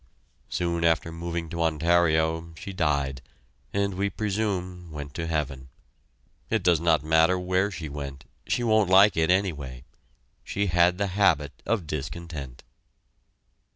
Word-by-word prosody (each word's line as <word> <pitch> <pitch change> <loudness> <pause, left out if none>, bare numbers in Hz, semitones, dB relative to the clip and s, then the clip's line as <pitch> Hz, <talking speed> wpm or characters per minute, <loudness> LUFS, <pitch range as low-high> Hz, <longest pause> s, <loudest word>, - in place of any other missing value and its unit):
Soon 85 -1 -1
after 85 0 +2
moving 85 0 -4
to 85 +1 -4
Ontario 80 0 +2
she 100 - -7
died, 70 -7 0 0.5
and 100 0 0
we 100 +2 -1
presume 95 -4 -3
went 70 -2 -7
to 80 0 -4
heaven. 70 -5 -3 0.8
It - - 0
does 85 -3 +4
not 80 -3 +2
matter 80 +3 +4
where 95 +2 +1
she 85 -5 -6
went 70 -2 -7 0.2
she 120 - 0
won't 110 -4 +3
like 95 +2 +7
it, 80 0 +2
anyway. 75 -10 0 0.6
She 100 - -1
had 90 +1 +4
the 100 - 0
habit 80 -8 +2
of 105 -5 0
discontent. 75 -2 -6
85 Hz, 135 wpm, -26 LUFS, 75-95 Hz, 0.8 s, like